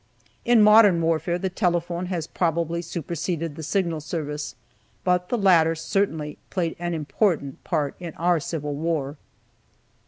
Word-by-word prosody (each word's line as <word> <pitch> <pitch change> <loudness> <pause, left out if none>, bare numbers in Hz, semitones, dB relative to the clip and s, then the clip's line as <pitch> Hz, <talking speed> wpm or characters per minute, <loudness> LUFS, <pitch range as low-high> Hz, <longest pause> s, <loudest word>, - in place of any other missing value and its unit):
In 235 -2 +6
modern 210 -4 +7
warfare 165 +1 0
the 185 +1 -3
telephone 175 -1 -1
has 175 -4 -2
probably 170 0 -1
superseded 165 -1 -4
the 160 - -7
Signal 170 -1 -1
Service, 150 -3 -4 0.5
but 180 -1 +1
the 245 - +1
latter 170 -6 +4
certainly 160 -3 -2
played 170 -4 -1
an 175 -1 -2
important 150 -1 -1
part 150 -5 -1
in 170 -3 -7
our 175 +1 +2
Civil 150 -1 -4
War. 150 -2 -2
170 Hz, 135 wpm, -24 LUFS, 155-180 Hz, 0.5 s, modern